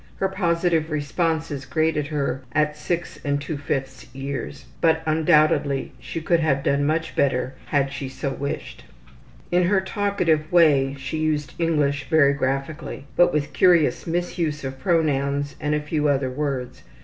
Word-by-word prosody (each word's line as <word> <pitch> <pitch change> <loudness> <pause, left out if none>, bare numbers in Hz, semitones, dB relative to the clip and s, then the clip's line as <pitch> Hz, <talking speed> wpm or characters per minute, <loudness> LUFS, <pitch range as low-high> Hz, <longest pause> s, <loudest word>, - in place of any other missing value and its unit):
Her 190 - 0
positive 170 -4 +1
responses 155 -1 -1
graded 155 -2 0
her 140 -3 -2
as 150 0 +1
6 175 +1 -3
2/5 145 -2 -3
years, 135 0 -5 0.2
but 160 -1 +3
undoubtedly 155 -3 +2
she 165 - -5
could 170 +2 +2
have 140 -4 +1
done 140 0 +1
much 160 +1 -1
better 130 -1 +1
had 140 -1 +1
she 135 -1 -5
so 135 +1 -4
wished. 140 +1 -5 0.7
In 175 0 +3
her 190 +2 +3
talkative 190 -6 0
way 145 -6 +4
she 135 +3 -5
used 150 -3 -1
English 150 -4 0
very 150 -4 +5
graphically, 135 +2 -3
but 175 - +5
with 150 -1 -1
curious 170 -8 +3
misuse 165 -3 -2
of 135 0 -5
pronouns 145 -3 0
and 150 0 0
a - - +1
few 150 0 -1
other 135 -2 +1
words. 130 -2 -3
150 Hz, 145 wpm, -23 LUFS, 140-165 Hz, 0.7 s, very